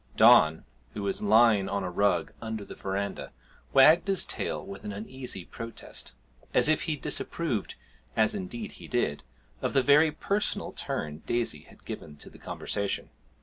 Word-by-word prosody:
Don, 80 +1 +6 0.3
who 105 - -4
was 100 -1 -1
lying 105 -1 +5
on 100 -1 -1
a 90 - -3
rug 90 -3 +1
under 110 -2 -4
the - - -9
verandah, 100 +1 -4 0.4
wagged 155 +7 +6
his 195 -2 +2
tail - - -2
with 100 - -9
an 105 - -4
uneasy 110 -2 -6
protest, 115 0 -7 0.4
as - - +5
if 155 0 +3
he 160 -3 0
disapproved 140 - -2 0.4
(as 110 - +4
indeed 210 +3 -5
he - - -12
did) 120 -12 0 0.4
of - - -1
the 135 -2 +4
very 150 +3 +6
personal 200 +7 -1
turn 75 +1 -4
Daisy 120 -1 -1
had - - -19
given 75 - -7
to - - -11
the - - -15
conversation. 100 -1 -3
110 Hz, 160 wpm, -28 LUFS, 100-150 Hz, 0.4 s, Don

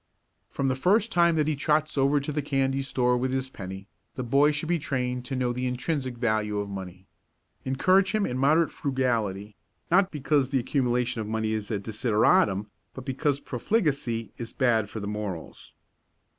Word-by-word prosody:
From 135 - -2
the 130 - +1
first 200 - +2
time 170 -1 +4
that 155 -1 +1
he 155 - +1
trots 150 +1 +1
over 140 +1 +3
to 140 +2 -4
the 150 0 -1
candy 135 -1 0
store 125 -2 +1
with 130 +1 -1
his 130 0 -2
penny, 95 -1 -8 0.3
the 130 - -3
boy 140 +5 +4
should 150 +2 -2
be 175 0 +1
trained 125 -3 -2
to 135 - -4
know 125 -1 0
the 125 +1 -2
intrinsic 125 0 -2
value 110 -3 0
of 100 0 -2
money. 95 -1 -8 0.6
Encourage 185 +9 +3
him 215 -1 +1
in 125 - -3
moderate 155 +5 +3
frugality, 115 -8 -1 0.4
not 190 +2 +5
because 145 -3 +1
the 135 - +1
accumulation 125 -2 0
of 105 - -5
money 110 0 -1
is 105 -2 -3
a 110 - 0
desideratum, 105 -2 +2 0.3
but 130 - -8
because 140 +1 0
profligacy 135 - -1
is 115 -1 -6
bad 115 -5 +2
for 110 - -6
the 100 - -5
morals. 105 -5 -6
130 Hz, 180 wpm, -27 LUFS, 110-145 Hz, 0.6 s, not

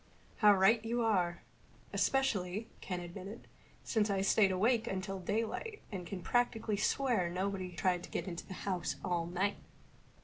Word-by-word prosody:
"How 210 -1 +7
right 205 +4 +5
you 235 +1 0
are. 180 -6 +1 0.5
Especially," 215 -6 +1
Ken 180 -2 -3
admitted, 190 +6 -8 0.4
"since 215 -2 +1
I 195 -1 +1
stayed 195 0 +4
awake 220 +5 +2
until 190 -1 -3
daylight 225 - -2
and 180 -4 -5
can 180 0 -5
practically 230 -3 +1
swear 215 -3 +1
nobody 185 0 -2
tried 180 0 +1
to - - -15
get - - -3
in 175 - -4
the 190 - -7
house 185 -4 -1
all 170 -2 0
night." 190 +4 0
195 Hz, 150 wpm, -34 LUFS, 180-225 Hz, 0.5 s, How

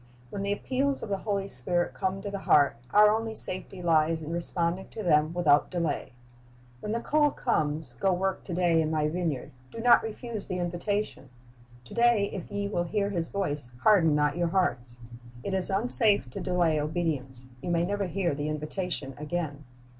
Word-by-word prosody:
When 200 - -5
the 200 0 -2
appeals 265 +6 -1
of - - -6
the 195 -1 -2
Holy 200 -2 -2
Spirit 175 +4 +1
come 190 +1 -3
to 205 - -5
the 200 - -4
heart, 145 -6 +3
our 210 0 +6
only 220 0 -2
safety 185 -1 +1
lies 160 -1 +2
in 155 - -6
responding 170 +2 0
to 220 - -7
them 155 -3 +2
without 155 -4 +2
delay. 170 -8 -3 0.7
When 210 - -5
the 230 - -1
call 295 +2 +2
comes, 155 - -2
"Go 195 - +2
work 190 +1 -2
to 180 - -6
day 170 -2 +2
in 155 - -1
My 155 -1 0
vineyard," 165 -5 -3 0.2
do - - -12
not 240 +1 +5
refuse 225 -1 -6
the 185 - -3
invitation. 175 -3 -3 0.6
"To - - -12
day 235 -4 +2
if 185 - -7
ye 200 0 -3
will 175 -4 -2
hear 200 +3 -1
His 170 -4 -3
voice, 145 -10 -3
harden 170 -8 +4
not 150 +2 +1
your 175 -1 0
hearts."' 125 -10 -1 0.5
It 195 - -4
is 190 0 -1
unsafe 205 - +6
to - - -6
delay 175 -4 +1
obedience. 145 -5 -3 0.2
You 175 - -5
may 170 0 +1
never 200 +1 -2
hear 175 -1 -1
the 145 +1 -3
invitation 155 -1 -4
again. 150 -2 -4
175 Hz, 185 wpm, -27 LUFS, 155-200 Hz, 0.7 s, our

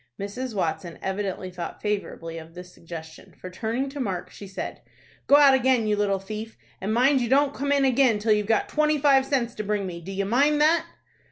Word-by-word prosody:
Mrs. 225 +4 -5
Watson 165 -2 -2
evidently 190 -1 -3
thought 175 -1 -6
favorably 165 -5 -4
of 165 +1 -13
this 180 0 -10
suggestion, 160 -1 -10
for, 185 - -8
turning 230 +8 -2
to 285 +1 -8
Mark, 190 -8 -3
she 200 - -10
said, 190 - -6 0.5
"Go 285 - +7
out 285 -2 +7
again, 260 -3 +3
you 210 -1 +2
little 205 -1 +1
thief, 215 +3 -7 0.2
and 195 +3 -2
mind 260 +4 +3
you 235 - -1
don't 280 +1 +3
come 285 +1 -2
in 280 -1 +3
again 255 -3 +3
till 215 +1 0
you've 210 -1 0
got 220 -1 +2
twenty 305 0 +1
five 275 -2 +4
cents 250 -4 0
to 215 - -5
bring 210 0 -1
to - - -4
me. 170 -1 -7
Do 185 +4 -8
you 195 0 -2
mind 285 +8 +3
that?" 325 +2 +3
215 Hz, 215 wpm, -25 LUFS, 190-270 Hz, 0.5 s, Go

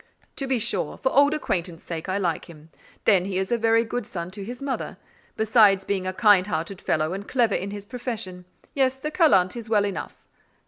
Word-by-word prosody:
"To 275 - -3
be 260 -1 +1
sure: 220 - -1
for 265 - 0
old 285 +1 +5
acquaintance 175 - -2
sake 165 +1 -6
I 185 - 0
like 175 -5 -1
him: 160 -1 -15 0.3
then 190 -4 +5
he 190 -1 -3
is 190 +2 -2
a 240 - +3
very 225 +1 +3
good 230 0 -4
son 170 -1 -6
to 195 +1 -7
his 240 +4 -7
mother; 275 -1 -4 0.4
besides 210 -3 +4
being 190 -2 -1
a - - 0
kind 200 -1 +4
hearted 170 +1 -3
fellow 155 +2 0
and 200 +1 -6
clever 240 -5 +2
in 195 - -2
his 205 0 -7
profession: 215 -6 -5 0.3
yes, 265 -2 +2
the 300 +3 -5
callant 195 - +4
is 230 -2 -7
well 210 -2 +3
enough." 200 -2 -5
200 Hz, 210 wpm, -24 LUFS, 185-240 Hz, 0.4 s, old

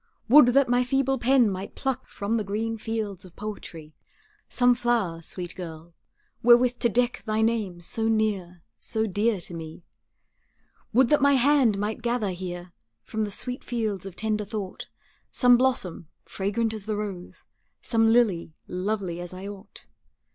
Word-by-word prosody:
Would 275 0 +9
that 275 -1 +5
my 245 +1 +3
feeble 270 +1 +1
pen 250 0 +4
might 195 0 -5
pluck 265 -3 -2
From 205 +3 -2
the 215 - -1
green 220 +3 -2
fields 215 -4 -4
of 180 -2 -14
poetry, 165 -7 -8 0.6
Some 245 -1 +4
flower, 235 -9 0
sweet 175 +1 -5
girl, 165 -2 -9 0.5
wherewith 245 +1 +5
to 235 - +2
deck 245 -2 0
Thy 215 0 +1
name 215 -6 -1
so 225 +6 -2
near, 200 -6 -1 0.2
so 220 -1 -1
dear 210 +1 0
to 175 - -7
me. 165 0 -8 1.1
Would 245 +2 +4
that 295 - +4
my 280 0 +5
hand 265 -5 +4
might 210 +3 -3
gather 235 -4 0
here 175 -1 -7 0.3
From 220 - -2
the - - -5
sweet 250 +5 -2
fields 215 -6 -3
of 185 - -10
tender 215 0 -1
thought, 200 -2 -6 0.4
Some 245 -1 +5
blossom, 240 -10 0 0.2
fragrant 220 +3 -1
as 215 -1 -7
the 215 - -1
rose, 195 -4 -6 0.4
Some 225 -1 +2
lily, 210 -9 +2
lovely 185 -2 -3
as 175 +1 -7
I 190 +2 -7
ought. 200 0 -11
215 Hz, 160 wpm, -26 LUFS, 185-240 Hz, 1.1 s, Would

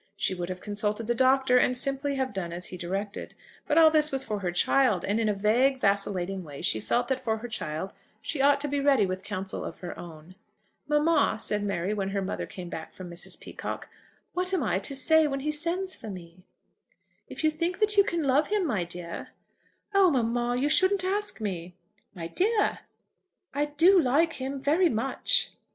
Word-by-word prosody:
She 195 - 0
would 175 -1 -4
have 185 0 -5
consulted 210 +1 -2
the 240 - +1
Doctor, 260 +1 +4
and 250 0 +2
simply 275 +2 -1
have 265 -3 -2
done 180 -4 -4
as 175 +1 -4
he - - -6
directed. 195 +4 -5 0.3
But 300 - +2
all 320 -1 +8
this 305 -1 +3
was 270 0 0
for 210 -2 -3
her 180 -3 -2
child, 210 +1 +2
and 205 +3 0
in 220 -1 +1
a - - +2
vague, 240 +7 +2
vacillating 195 -3 0
way 145 -4 -9
she 110 - +1
felt 240 - 0
that 265 -1 0
for 220 -3 -1
her 235 +2 -7
child 190 -4 -4 0.3
she 295 - -3
ought 280 0 +4
to 295 - -1
be 285 0 -1
ready 275 -6 +4
with 185 0 -3
counsel 195 -2 -5
of - - -7
her 175 - -6
own. 165 0 -11 0.5
"Mamma," 300 -5 +3
said 210 -1 -1
Mary, 195 0 -1
when 195 -2 -2
her 195 0 -1
mother 190 - -4
came 180 -2 -8
back 160 -2 -7
from 180 -2 -9
Mrs. 170 - -7
Peacocke, - - -7 0.4
"what 365 +1 0
am 330 - 0
I 190 -4 +1
to 275 +8 -1
say 315 +3 +4
when 275 -1 -3
he 305 +2 -1
sends 345 +5 -2
for 220 - -9
me?" 180 -1 -11 0.8
"If - - -8
you 310 - +4
think 335 +4 -2
that 425 -1 +3
you 400 - +7
can 340 -4 -2
love 285 +2 +3
him, 415 -3 0
my 215 - 0
dear 175 0 -6 0.4
" - - -38
"Oh, 395 -2 +6
mamma, 240 -3 0
you 280 - +1
shouldn't 375 +5 +3
ask 405 -1 -2
me!" 180 -4 -4 0.4
"My 170 -2 -6
dear!" 415 - +1 0.7
"I 290 +1 +1
do 335 +6 +5
like 315 +5 +2
him, 270 +1 -3
very 320 +6 +3
much." 240 +2 +1
245 Hz, 205 wpm, -27 LUFS, 190-300 Hz, 0.8 s, all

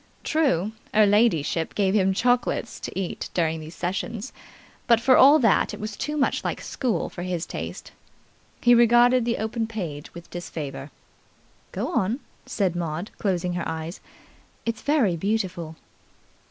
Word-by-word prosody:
True, 260 - +1 0.2
'er 215 0 +7
ladyship 200 -7 +2
gave 195 -2 +2
him 195 -2 +3
chocolates 240 +3 0
to - - -5
eat 185 - -4
during 160 -2 +1
these 155 +2 -10
sessions, 200 +6 -4 0.5
but 235 -2 +5
for 255 +2 +5
all 285 +3 +8
that 225 -9 +2
it - - -13
was 215 0 -5
too 300 +6 -3
much 270 - +1
like - - -2
school 250 -5 -2
for 175 - -8
his 180 -2 -2
taste. - - -7 0.7
He 240 - +6
regarded 240 +1 +5
the 235 -1 0
open 220 +1 -2
page 170 -10 -6
with 170 0 -10
disfavour. 155 -5 -6 0.8
"Go - - -3
on," 215 +8 0 0.3
said 195 -8 0
Maud, 170 +2 -3
closing 180 -3 0
her 175 -1 -3
eyes. 160 +2 -5 0.7
"It's 230 -1 -2
very 275 - +2
beautiful." 180 -4 -2
200 Hz, 150 wpm, -25 LUFS, 175-235 Hz, 0.8 s, all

